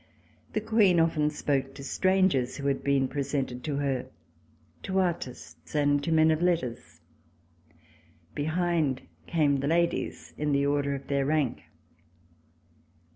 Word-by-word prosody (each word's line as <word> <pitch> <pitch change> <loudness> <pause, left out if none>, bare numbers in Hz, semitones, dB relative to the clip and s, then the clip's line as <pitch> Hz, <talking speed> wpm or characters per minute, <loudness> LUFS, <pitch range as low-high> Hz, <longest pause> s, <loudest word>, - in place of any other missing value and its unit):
The 215 - 0
Queen 210 -5 +4
often 160 -2 +2
spoke 135 -3 -1
to 140 - -9
strangers 185 -6 +1
who 140 - -6
had 140 -1 0
been 140 -1 +2
presented 135 -3 -3
to 150 -3 -2
her, 140 -3 -1 0.7
to 190 - -3
artists 170 -7 -4
and 145 -1 +2
to 165 - -1
men 160 0 +5
of 155 +1 0
letters. 165 -10 -1 1.3
Behind 160 -3 0 0.2
came 145 -4 +2
the 140 - -1
ladies 170 +2 -1
in 150 -1 0
the 140 0 +2
order 140 0 +1
of 135 0 -8
their 140 0 0
rank. 150 -4 0
145 Hz, 130 wpm, -28 LUFS, 140-165 Hz, 1.3 s, men